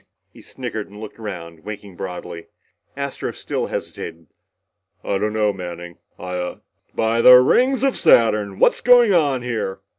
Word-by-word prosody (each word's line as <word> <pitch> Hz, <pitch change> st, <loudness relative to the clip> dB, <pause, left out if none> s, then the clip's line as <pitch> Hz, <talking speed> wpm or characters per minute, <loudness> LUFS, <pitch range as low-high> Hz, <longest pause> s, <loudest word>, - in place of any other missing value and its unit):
He -, -, -15 dB
snickered -, -, -6 dB
and 105 Hz, +1 st, -13 dB
looked 110 Hz, +1 st, -10 dB
around, 85 Hz, -7 st, -8 dB
winking 105 Hz, -2 st, -9 dB
broadly. 90 Hz, -2 st, -7 dB, 0.5 s
Astro 140 Hz, -1 st, -4 dB
still -, -, -4 dB
hesitated, 85 Hz, 0 st, -7 dB, 0.8 s
"I 100 Hz, -, -1 dB
don't 105 Hz, +1 st, -1 dB
know, 105 Hz, -1 st, +1 dB
Manning. 85 Hz, -2 st, -8 dB, 0.2 s
I 90 Hz, 0 st, -7 dB
uhh 90 Hz, 0 st, -5 dB, 0.2 s
" -, -, -41 dB
"By 115 Hz, +1 st, +1 dB
the 125 Hz, +1 st, +9 dB
rings 250 Hz, -, +4 dB
of 270 Hz, -1 st, +2 dB
Saturn! 105 Hz, -, +3 dB
What's -, -, +3 dB
going 240 Hz, -4 st, +6 dB
on 140 Hz, -7 st, +2 dB
here?" 110 Hz, -6 st, -4 dB
105 Hz, 155 wpm, -21 LUFS, 90-125 Hz, 0.8 s, the